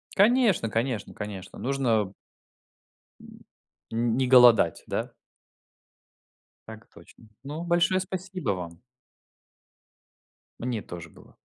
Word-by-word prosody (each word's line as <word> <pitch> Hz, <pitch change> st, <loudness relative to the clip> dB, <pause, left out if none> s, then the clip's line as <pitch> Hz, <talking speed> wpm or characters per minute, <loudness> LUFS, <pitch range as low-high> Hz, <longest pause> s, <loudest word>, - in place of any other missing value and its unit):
Конечно 210 Hz, -, +3 dB
конечно 115 Hz, 0 st, -2 dB
конечно 105 Hz, -3 st, -8 dB
нужно 120 Hz, -7 st, 0 dB, 1.1 s
М, -, -, -15 dB, 0.5 s
н 115 Hz, +1 st, 0 dB
не 130 Hz, -1 st, +1 dB
голодать, 120 Hz, -9 st, +6 dB
да? -, -, -3 dB, 1.6 s
Так 110 Hz, 0 st, -11 dB
точно. 115 Hz, -, -18 dB, 0.2 s
Ну, 150 Hz, +4 st, -6 dB
большое 175 Hz, +2 st, +2 dB
спасибо 185 Hz, -, -5 dB
вам. 85 Hz, -3 st, -6 dB, 1.8 s
Мне 120 Hz, -3 st, -3 dB
тоже 85 Hz, -3 st, -9 dB
было. -, -, -19 dB
120 Hz, 95 wpm, -26 LUFS, 105-170 Hz, 1.8 s, голодать